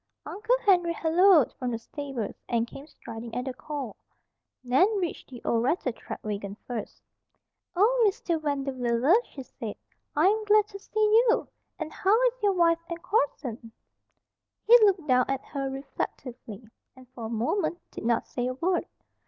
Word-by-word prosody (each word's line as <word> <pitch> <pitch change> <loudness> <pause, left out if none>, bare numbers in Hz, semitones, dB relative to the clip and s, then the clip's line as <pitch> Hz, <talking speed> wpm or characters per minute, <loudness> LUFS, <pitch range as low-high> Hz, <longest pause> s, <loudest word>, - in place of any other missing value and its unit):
Uncle 440 +5 0
Henry 350 -4 +4
halloaed 335 - +4
from 250 - -2
the 230 - -2
stables, 260 -2 -5 0.2
and 230 -1 +1
came 275 +5 -11
striding 230 -4 -9
at 250 +1 -2
the 260 - -3
call. 270 -4 -6 0.7
Nan 260 +9 +4
reached 355 -4 -4
the 245 -3 -11
old 230 - +2
rattletrap 255 -3 -2
wagon 200 -1 -4
first. 240 -4 -6 0.7
"Oh, 460 +6 +4
Mr. 350 -5 -1
Vanderwiller!" 270 -2 +1
she 270 - -9
said. 225 -4 -7 0.4
"I 305 +3 +3
am 430 +3 +3
glad 420 0 +5
to 395 -1 -9
see - - -24 0.4
you! 460 - +2 0.3
And 315 -1 -5
how 405 +4 +3
is - - -18
your 405 -1 +3
wife 335 -2 +3
and 335 0 -4
Corson?" 255 - -1 0.9
He 470 - +8
looked 390 -7 +3
down 255 -1 +4
at 270 0 -2
her 275 -2 -3
reflectively, 255 -4 -6 0.3
and 260 -1 -16
for 240 -3 -8
a - - -4
moment 290 - -1
did - - -8
not 230 0 +1
say 245 -1 -3
a 255 - -3
word. 350 +6 0
275 Hz, 160 wpm, -27 LUFS, 245-360 Hz, 0.9 s, He